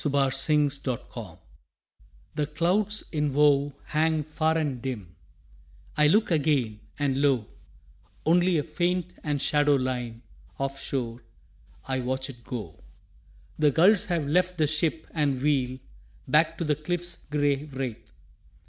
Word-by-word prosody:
LAST 135 -2 +2
SIGHT 145 -2 +2
OF 125 -3 -1
LAND 105 -9 -8 1.0
The 150 -1 -1
clouds 190 +7 +2
in 150 -3 0
woe 145 -1 +4
hang 155 0 +1
far 155 +1 0
and 140 -6 -2
dim: 105 -10 -5 0.8
I 150 0 +5
look 210 +5 +3
again, 140 -9 +1 0.2
and 140 -1 0
lo, 135 -6 +2 0.8
Only 175 +1 +4
a 150 - +1
faint 175 +3 -1
and 145 -2 -1
shadow 145 +1 +3
line 125 -3 -3 0.3
Of 135 0 -3
shore 120 -4 -3 0.7
I 130 -1 0
watch 130 +2 -2
it 120 -2 -18
go. 105 -11 -7 0.8
The 150 -1 +5
gulls 180 +8 +5
have 170 -5 -1
left 180 +4 +1
the 155 - +3
ship 155 +1 0
and 145 -5 0
wheel 130 -3 +1 0.5
Back 160 +2 +3
to - - -2
the 150 -2 +2
cliff's 175 +4 -3
gray 145 -1 +1
wraith. 130 -5 -6
145 Hz, 140 wpm, -27 LUFS, 130-160 Hz, 1.0 s, I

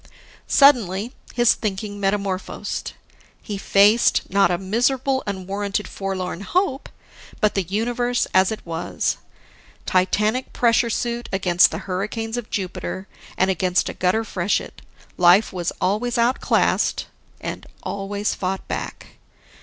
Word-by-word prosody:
Suddenly, 235 -5 +4 0.2
his 240 -1 +5
thinking 205 0 -4
metamorphosed: 195 -1 -2 0.4
He 205 -3 -6
faced, 205 +4 +4
not 195 -1 +4
a 175 - +1
miserable, 250 +7 +1
unwarranted 200 +1 -3
forlorn 190 -2 -4
hope, 300 - -1 0.5
but 210 -2 +2
the 195 - +1
universe 240 +6 0
as 190 +1 +4
it 220 - -6
was. 165 0 -2 0.7
Titanic 210 +7 +1
pressure 235 0 +3
suit 235 +1 -2
against 180 -2 +4
the - - -5
hurricanes 215 +4 -3
of 240 -3 -5
Jupiter, 190 0 -4 0.3
and 190 +1 +3
against 185 0 +1
a - - -5
gutter 185 +5 +1
freshet, 195 -2 -2 0.4
life 180 +5 +5
was 175 -2 -2
always 225 +6 0
outclassed 235 +2 +2 0.3
and - - -6 0.2
always 200 +1 -2
fought 190 0 -3
back. - - -6
200 Hz, 120 wpm, -22 LUFS, 190-235 Hz, 0.7 s, his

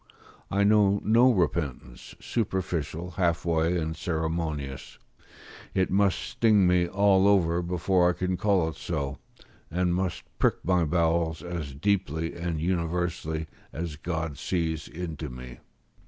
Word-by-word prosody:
I 100 +1 +2
know 100 -1 +4
no 120 +4 +5
repentance, 75 - -2
superficial, 90 - -2
half 85 -1 0
way, 85 +1 +2
and 80 -1 -2
ceremonious; 80 -4 -3 0.8
it 95 -1 +1
must 100 0 +3
sting 105 -4 +3
me 90 -1 +3
all 100 +1 +4
over 90 -4 +3
before 90 +1 +2
I - - +1
can 90 +1 -1
call 95 -3 +2
it 80 - -8
so, 70 -5 -3 0.5
and 90 +1 0
must 90 0 -2 0.2
prick - - +3
my 90 -2 +3
bowels 80 0 +1
as 85 -6 -5
deeply 80 -2 0
and 85 -2 -3
universally 85 -2 -1 0.3
as 80 -1 -4
God 80 -3 -4
sees 80 -3 -2
into 80 -3 -6
me. 60 0 -9
85 Hz, 130 wpm, -27 LUFS, 80-95 Hz, 0.8 s, no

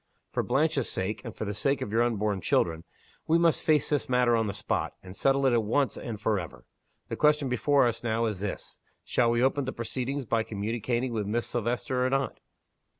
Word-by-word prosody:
For - - 0
Blanche's 145 -3 +1
sake, 95 +4 -3
and 115 - -7
for - - -4
the 105 - -3
sake 135 +7 0
of 100 - -4
your 115 +2 +2
unborn 105 -4 0
children, 80 -1 +1 0.4
we 165 - +4
must 170 -1 +3
face 155 -2 +2
this 145 -3 0
matter 125 -1 +3
on 115 -1 +1
the - - -1
spot - - -2
and 90 0 -10
settle 135 +3 +2
it 130 - +4
at 115 -2 +3
once 130 +6 +1
and 110 -4 -6
forever. 105 -6 -2 0.4
The - - -2
question 150 -2 +3
before 135 +3 +3
us 120 0 -1
now 115 0 +1
is 105 -4 -2
this. 100 0 -5 0.2
Shall 120 - +2
we 120 +1 +2
open 135 +1 +2
the 130 - -2
proceedings 130 +3 -3
by 115 0 +1
communicating 115 +4 -2
with 105 -3 -2
Miss 115 +3 0
Silvester 120 +2 -1
or 130 - +2
not?" 135 0 -1
120 Hz, 210 wpm, -28 LUFS, 110-135 Hz, 0.4 s, we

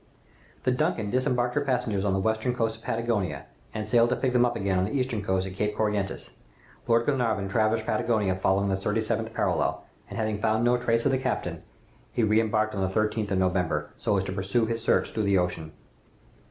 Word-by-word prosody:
"The 125 - +2
'Duncan' 125 - 0
disembarked 125 -1 +1
her 145 - +1
passengers 120 -7 0
on 100 -2 +1
the 95 - +1
western 110 +4 0
coast 115 -2 -1
of - - -20
Patagonia, 115 -7 -2 0.3
and 110 -1 -4
sailed 120 +1 +4
to 125 - +1
pick 125 +1 -1
them 125 0 +4
up 120 - -3
again 100 -4 0
on 90 - +2
the 120 +7 -1
eastern 125 -4 -1
coast 95 -1 0
at 95 - -6
Cape 105 +2 -1
Corrientes. 105 -2 -1 0.6
Lord 115 0 +3
Glenarvan 115 -8 0
traversed 110 +1 +1
Patagonia, 110 -3 +1
following 95 +1 +1
the 95 - +1
thirty 105 +3 -1
seventh 110 - -2
parallel, - - 0 0.3
and - - -7
having 110 -2 -1
found 110 +1 +2
no 120 +1 +4
trace 115 -1 +1
of 140 - +4
the 130 - +1
captain, - - -2 0.5
he 120 - 0
re 110 +1 +4
embarked 110 -1 0
on 100 - -2
the 95 - +1
13th 105 +2 0
of 95 - 0
November, 90 -5 0
so 100 - +1
as 95 - +1
to 95 - -4
pursue 100 +4 0
his 115 0 -2
search - - +1
through 110 - -2
the 100 -2 +3
Ocean. 90 -3 -2
110 Hz, 215 wpm, -27 LUFS, 95-120 Hz, 0.6 s, sailed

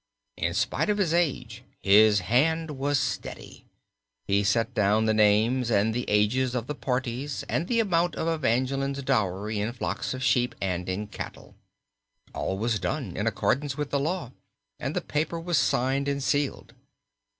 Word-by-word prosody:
In - - -1
spite - - 0
of 205 - +2
his 185 -6 +1
age 125 -9 -1 0.2
his 105 0 +6
hand 155 - +1
was 140 +1 0
steady, 135 -2 -5 0.6
He 100 +1 +2
set 110 +3 +1
down 105 +1 +2
the 110 - +3
names 110 +4 +3
and 110 0 +2
the 120 +1 -3
ages 120 +5 +2
of 120 -2 -2
the 150 - -4
parties 130 0 -3
and 165 - -1
the 230 +1 +1
amount 175 -6 +1
of 160 - -2
Evangeline's 135 -2 0
dowry 105 -1 0
in 105 +3 -1
flocks 125 - -3
of 130 - -5
sheep 125 -2 +2
and 90 -2 -2
in 100 +3 -2
cattle. 105 - -9 0.8
All 95 - -2
was 110 +1 0
done 90 -2 -3
in - - -1
accordance 140 0 0
with 145 -1 -3
the 140 - +1
law 160 -3 -2 0.5
and - - -3
the - - 0
paper 160 +3 -2
was 165 -3 +1
signed 135 +3 +1
and 140 -1 -1
sealed. 145 0 -1
130 Hz, 165 wpm, -27 LUFS, 110-145 Hz, 0.8 s, his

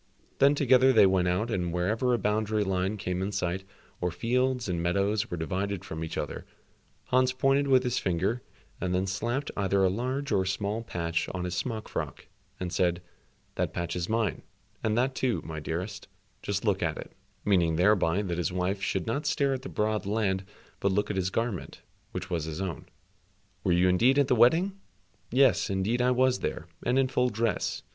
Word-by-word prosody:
Then 140 +1 +6
together 130 -2 +5
they 110 -5 +7
went 95 -1 +3
out 100 +7 0
and 90 -5 -1
wherever 105 +9 0
a 120 - +3
boundary 105 0 0
line 95 +1 -1
came 90 -2 -2
in 95 +2 -2
sight, 95 -1 -2 0.4
or 90 - +1
fields 125 +6 0
and 85 -2 -1
meadows 100 +5 +1
were 90 - -3
divided 95 +3 -2
from 80 0 -5
each 80 - -5
other, - - -4 0.7
Hans 130 0 +3
pointed 135 +2 +2
with 130 -2 +5
his 125 -1 0
finger 95 +7 0 0.4
and 90 0 0
then 95 +1 +1
slapped 120 +8 -2
either 100 -1 +2
a 95 - +4
large 130 +6 -2
or 100 -3 +3
a 95 - -2
small 100 +3 -1
patch 85 -7 -2
on 90 - -3
his 90 -1 -3
smock 110 +3 -3
frock, - - -5 0.3
and 90 -1 -4
said, 90 -1 +1 0.5
"That - - -2
patch 85 0 -3
is 90 -1 -3
mine, 110 -4 0 0.4
and 110 0 +1
that 130 +2 +2
too, 125 -7 0
my 80 -1 -5
dearest, 90 +6 -5 0.3
just - - -2
look - - +1
at - - -1
it," - - -8 0.3
meaning 85 -5 +3
thereby 95 0 +3
that 90 -3 -2
his 90 - 0
wife 90 +2 -1
should 95 -3 -1
not 140 +7 -2
stare 140 -2 +2
at 130 - -3
the 135 - -7
broad 105 -1 -1
land, 100 -3 0 0.4
but 100 - +1
look 105 +2 0
at - - -3
his 95 -1 0
garment, 115 -3 -3 0.3
which 90 - -5
was 85 -4 -2
his 80 +1 -5
own. 90 -6 -4 0.8
"Were - - +2
you 90 +1 +4
indeed 120 +10 +4
at 140 -2 +3
the 125 - +4
wedding?" 170 - +4 0.5
"Yes, 130 0 +4
indeed 100 +6 0
I 125 - +3
was 125 0 +3
there, 85 - -3 0.2
and 125 +2 +1
in 135 -1 +4
full 125 -1 +1
dress. 115 0 -1
100 Hz, 200 wpm, -28 LUFS, 90-125 Hz, 0.8 s, they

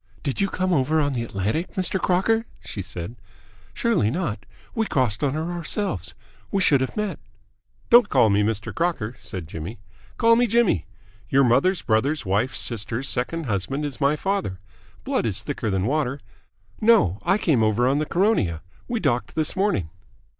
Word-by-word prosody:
"Did 140 +2 -2
you 195 - +2
come 185 0 0
over 155 +1 +2
on 145 -2 +1
the 120 - -1
Atlantic, 110 - -2
Mr. 185 0 0
Crocker?" 225 +5 +2 0.2
she 100 - -5
said. 90 +3 -6 0.6
"Surely 225 - +1
not? 120 - -3 0.3
We 225 -2 0
crossed 125 -2 0
on 140 0 +1
her 160 +3 -2
ourselves. 170 - -2 0.4
We 200 - +1
should 145 -8 +4
have 130 - -3
met." 210 -2 -2 0.7
"Don't 235 -2 +7
call 120 -6 +4
me 100 +1 +3
Mr. 110 +1 -1
Crocker," 165 -10 -1
said 90 -5 -7
Jimmy. 85 +8 -6 0.4
"Call 230 -1 +5
me 245 +1 +3
Jimmy. 220 - +2 0.4
Your 135 +1 +4
mother's 175 +10 +3
brother's 125 +7 +1
wife's 105 +7 0
sister's 115 +3 -2
second 135 +7 -1
husband 125 +7 -2
is 145 0 -5
my 140 +2 +3
father. 190 - -2 0.4
Blood - - 0
is - - -2
thicker 110 - -3
than 95 -1 0
water. 140 0 0 0.6
No, 215 - +4
I 195 - +2
came 155 - +2
over 110 +3 +2
on 140 +3 +2
the 155 - -1
Caronia. 170 - +1 0.2
We 240 -2 -1
docked 120 - -1
this 155 +1 -1
morning." 190 - 0
140 Hz, 170 wpm, -24 LUFS, -, 0.7 s, Don't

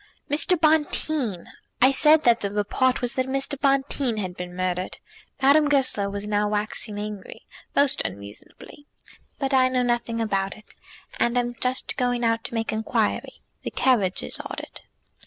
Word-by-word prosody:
"Mr. 320 +4 +3
Bonteen! 305 - +1 0.3
I 260 +2 +6
said 305 +3 +5
that 235 -1 +4
the 200 - -2
report 230 +6 0
was 245 - 0
that 260 0 -1
Mr. 270 +2 +1
Bonteen 275 -3 +1
had 185 -4 -4
been 180 0 -7
murdered." 185 0 -2 0.4
Madame 290 +2 +4
Goesler 260 -8 +2
was 200 +1 -5
now 210 0 0
waxing 210 0 -2
angry, 210 -1 -7 0.3
most 280 -1 +2
unreasonably. 100 - -9 0.5
"But 270 -1 -2
I 260 -1 +5
know 255 -1 +1
nothing 240 -1 -1
about 195 -3 -1
it, 215 - -18 0.5
and 240 +1 +1
am 240 0 0
just 250 +2 -2
going 245 -2 0
out 230 0 +1
to - - -6
make 225 -1 -1
inquiry. 220 0 -2 0.2
The - - -4
carriage 205 -8 +1
is - - -6
ordered." - - -8
240 Hz, 155 wpm, -24 LUFS, 205-270 Hz, 0.5 s, I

